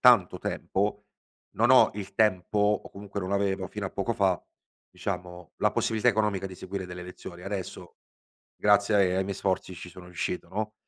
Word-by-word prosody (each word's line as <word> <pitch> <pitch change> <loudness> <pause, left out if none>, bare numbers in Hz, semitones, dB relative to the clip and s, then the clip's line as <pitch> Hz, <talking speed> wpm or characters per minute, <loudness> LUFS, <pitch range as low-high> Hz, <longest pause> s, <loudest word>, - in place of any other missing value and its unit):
tanto 105 -8 +6
tempo, 105 +3 -1 0.5
non - - +4
ho - - +8
il 100 -1 -6
tempo 105 -2 +2 0.2
o - - -10
comunque 100 0 -6
non 95 +1 -3
avevo 100 -1 +1
fino 105 +1 -5
a 95 - -3
poco 115 +4 -1
fa, 95 -5 +2 0.5
diciamo 90 -1 -5
la - - +3
possibilità 110 +2 +1
economica 105 -4 +2
di 95 - -8
seguire 95 +1 -5
delle 90 0 -7
lezioni. 90 0 -9
Adesso 100 -2 -5 0.6
grazie 100 0 +4
ai 95 -2 +4
ai 95 - +2
miei 100 0 -3
sforzi 95 -1 -1
ci 90 +1 -8
sono 90 +1 -12
riuscito, 90 0 -3
no. 110 +2 -3
95 Hz, 175 wpm, -28 LUFS, 90-105 Hz, 0.6 s, ho